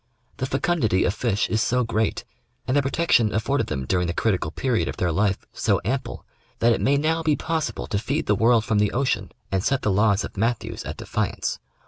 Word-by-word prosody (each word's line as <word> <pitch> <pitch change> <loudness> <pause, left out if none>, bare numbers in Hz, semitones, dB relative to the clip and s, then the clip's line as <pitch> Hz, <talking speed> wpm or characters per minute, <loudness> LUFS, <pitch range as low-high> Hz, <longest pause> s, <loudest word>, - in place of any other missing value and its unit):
The 130 - -2
fecundity 135 - +1
of 90 - +1
fish 105 -4 0
is 110 - 0
so 125 +2 +2
great, 110 -1 -1 0.4
and 130 - +1
the 145 - +4
protection 135 -6 +2
afforded 115 +7 0
them 65 -3 -3
during 90 +5 +1
the 85 - -3
critical 95 -8 0
period 120 +7 0
of - - -5
their 90 -1 0
life 100 +3 0
so - - +1
ample, 130 +4 -3 0.3
that 115 0 +4
it - - -2
may 140 +1 +3
now 160 +3 +1
be 155 -2 +2
possible 160 +1 -2
to 100 - -1
feed 140 +8 -2
the 105 - +3
world 115 +2 +3
from 110 -3 +1
the 105 -1 +1
ocean 120 -7 0 0.2
and 95 -1 0
set 135 +3 0
the 105 - +2
laws 100 +1 +3
of - - -7
Matthews 115 +3 -2
at - - -6
defiance. - - -2
115 Hz, 210 wpm, -24 LUFS, 100-135 Hz, 0.4 s, the